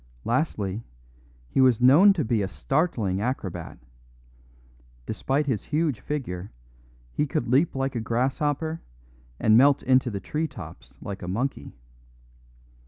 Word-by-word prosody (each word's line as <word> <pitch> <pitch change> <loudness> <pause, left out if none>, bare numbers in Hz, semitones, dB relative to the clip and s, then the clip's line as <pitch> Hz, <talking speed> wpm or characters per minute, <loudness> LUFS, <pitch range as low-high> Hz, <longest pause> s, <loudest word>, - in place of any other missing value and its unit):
Lastly, 115 - -1 0.6
he 130 - +1
was 130 -4 +5
known 145 +11 +7
to 160 -8 -1
be 110 -1 +1
a 95 - -1
startling 115 - -1
acrobat; 110 -6 -4 1.3
despite 135 +7 -1
his 125 -8 -2
huge 150 -6 0
figure, 100 -10 -5 0.6
he 150 - 0
could 120 - -2
leap 135 +7 +2
like 135 0 -1
a - - 0
grasshopper 145 +7 -1 0.6
and 110 0 +5
melt 140 +2 +5
into 130 -1 +3
the 100 -3 -4
tree 155 +9 -2
tops - - -12
like 100 -1 -6
a 90 - -6
monkey. 120 - -3
130 Hz, 130 wpm, -25 LUFS, 110-145 Hz, 1.3 s, known